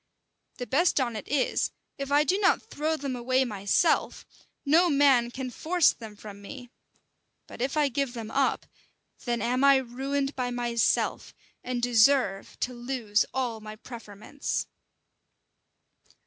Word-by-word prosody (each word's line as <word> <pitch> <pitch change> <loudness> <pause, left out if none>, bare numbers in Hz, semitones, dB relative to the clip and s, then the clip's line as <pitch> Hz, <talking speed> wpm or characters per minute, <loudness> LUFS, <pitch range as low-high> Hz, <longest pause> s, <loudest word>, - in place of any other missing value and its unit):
The 245 - -4
best 315 +6 +2
on 240 -3 -1
it 215 - -6
is, 280 -2 0 0.3
if 275 0 -4
I 290 +1 +5
do 370 +7 +1
not 395 - +3
throw 310 +2 -1
them 275 -3 -4
away 255 +2 +1
myself, 205 - +1 0.4
no 335 +5 +4
man 275 -5 +4
can 255 +1 -6
force 340 +6 +2
them 220 -3 -11
from 205 -1 -11
me: 245 +3 -10 0.7
but - - -11
if 265 +4 -1
I 295 -1 +4
give 275 -1 -2
them 225 -2 -6
up, 275 -1 +1 0.6
then 240 -1 -1
am 250 +3 0
I 280 0 +7
ruined 270 +3 -2
by 250 -2 -2
myself, 240 -1 0 0.3
and 245 -1 -3
deserve 240 -3 +2
to 250 - -1
lose 240 -4 -1
all 245 -4 -2
my 215 0 -8
preferments." 225 +3 -5
255 Hz, 145 wpm, -27 LUFS, 235-280 Hz, 0.7 s, I